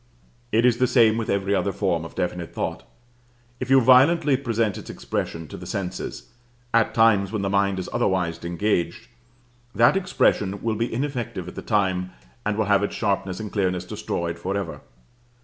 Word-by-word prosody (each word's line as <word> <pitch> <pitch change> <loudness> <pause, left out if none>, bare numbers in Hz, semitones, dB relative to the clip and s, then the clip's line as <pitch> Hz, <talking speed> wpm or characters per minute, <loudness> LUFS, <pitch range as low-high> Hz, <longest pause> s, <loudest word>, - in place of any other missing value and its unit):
It 115 +3 +3
is 120 -2 +4
the 125 0 +3
same 115 -3 +4
with 115 -1 -3
every 100 0 0
other 100 0 +1
form 85 -5 -1
of - - -10
definite 90 -1 -3
thought. - - -4 0.7
If 125 - -4
you 135 0 +7
violently 135 +4 +5
present 115 -6 0
its - - -11
expression 80 -1 -4
to - - -8
the - - -9
senses, 95 +4 -5 0.4
at 115 -1 +2
times 105 -4 +4
when 105 -3 -2
the 95 - -1
mind 100 -1 +2
is 95 - -4
otherwise 90 -8 0
engaged, 85 -1 -1 0.7
that 120 +9 +5
expression 105 - +1
will 115 -1 0
be 115 +2 -2
ineffective 120 -8 -3
at 90 - -7
the - - -7
time, 95 -4 0 0.3
and 105 0 -1
will 110 - +1
have 100 -1 +3
its 100 - -2
sharpness 100 -3 -1
and 105 -1 -6
clearness 90 -3 -1
destroyed 85 -1 -4
forever. 90 -4 -3
100 Hz, 175 wpm, -24 LUFS, 90-115 Hz, 0.7 s, you